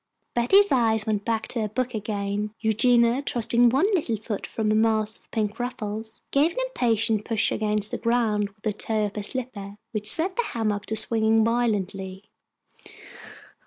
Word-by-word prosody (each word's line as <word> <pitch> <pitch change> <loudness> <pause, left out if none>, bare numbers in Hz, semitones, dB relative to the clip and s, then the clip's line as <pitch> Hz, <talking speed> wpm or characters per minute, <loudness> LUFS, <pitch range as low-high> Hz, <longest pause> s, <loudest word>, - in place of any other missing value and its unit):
Betty's 390 +13 +4
eyes 225 -4 +3
went 210 -2 -2
back 225 -1 -1
to 235 - -2
her 215 - -1
book 250 +4 -3
again. 205 0 -3
Eugenia, 235 +3 +3
thrusting 240 -1 +2
one 270 +9 +2
little 295 -11 0
foot 210 -1 -5
from 215 -1 -1
a - - +3
mass 220 0 +2
of - - -11
pink 215 0 -2
ruffles, 220 -3 -5
gave 300 +5 +2
an - - -18
impatient 225 - +1
push 225 -1 0
against 210 -1 +1
the - - -3
ground 225 -3 0
with 205 +1 -31
the 215 - -1
toe 215 +1 -1
of 205 - -6
her 210 - -3
slipper, 205 -3 -5 0.2
which 215 -1 0
set 370 +4 +4
the - - +3
hammock 215 - -2
to 220 - -2
swinging 220 0 +2
violently. 200 -4 -2
220 Hz, 170 wpm, -24 LUFS, 210-240 Hz, 0.2 s, Betty's